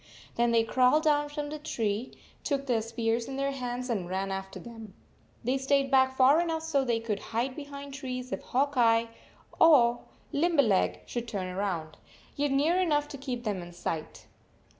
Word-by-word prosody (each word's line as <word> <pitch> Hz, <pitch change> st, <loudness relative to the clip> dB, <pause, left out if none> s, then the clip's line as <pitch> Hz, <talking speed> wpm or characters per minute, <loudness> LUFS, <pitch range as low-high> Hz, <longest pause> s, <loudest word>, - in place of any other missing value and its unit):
Then 240 Hz, 0 st, +2 dB
they 230 Hz, -1 st, +4 dB
crawled 255 Hz, +6 st, +3 dB
down 295 Hz, -2 st, +2 dB
from 295 Hz, 0 st, -4 dB
the 305 Hz, -, -5 dB
tree, 230 Hz, -6 st, -2 dB, 0.3 s
took 275 Hz, -2 st, -1 dB
their 240 Hz, -4 st, +1 dB
spears 230 Hz, +1 st, -1 dB
in 270 Hz, -, -5 dB
their 275 Hz, +1 st, 0 dB
hands, 250 Hz, -2 st, -4 dB
and 200 Hz, -8 st, -2 dB
ran 190 Hz, +1 st, -2 dB
after 195 Hz, 0 st, -5 dB
them. 225 Hz, -4 st, -11 dB, 0.5 s
They 255 Hz, +3 st, 0 dB
stayed 275 Hz, 0 st, +1 dB
back 260 Hz, 0 st, +4 dB
far 275 Hz, +5 st, +6 dB
enough 325 Hz, -2 st, -2 dB
so 295 Hz, -4 st, +1 dB
they 235 Hz, -3 st, 0 dB
could 225 Hz, -2 st, -3 dB
hide 240 Hz, +4 st, -2 dB
behind 280 Hz, -1 st, -8 dB
trees 255 Hz, -2 st, -5 dB
if -, -, -3 dB
Hawk 280 Hz, +3 st, 0 dB
Eye 230 Hz, -1 st, +4 dB, 0.5 s
or 245 Hz, -7 st, +6 dB, 0.3 s
Lim 335 Hz, +3 st, +1 dB
berleg 215 Hz, -9 st, +3 dB
should 240 Hz, -1 st, -4 dB
turn 185 Hz, -4 st, -4 dB
round, 175 Hz, -6 st, -3 dB, 0.4 s
yet 290 Hz, 0 st, 0 dB
near 300 Hz, +7 st, +2 dB
enough 295 Hz, -5 st, +1 dB
to 280 Hz, -, -7 dB
keep 250 Hz, -3 st, -4 dB
them 205 Hz, -5 st, -2 dB
in 175 Hz, 0 st, -10 dB
sight. 160 Hz, -2 st, -5 dB
255 Hz, 180 wpm, -29 LUFS, 225-280 Hz, 0.5 s, far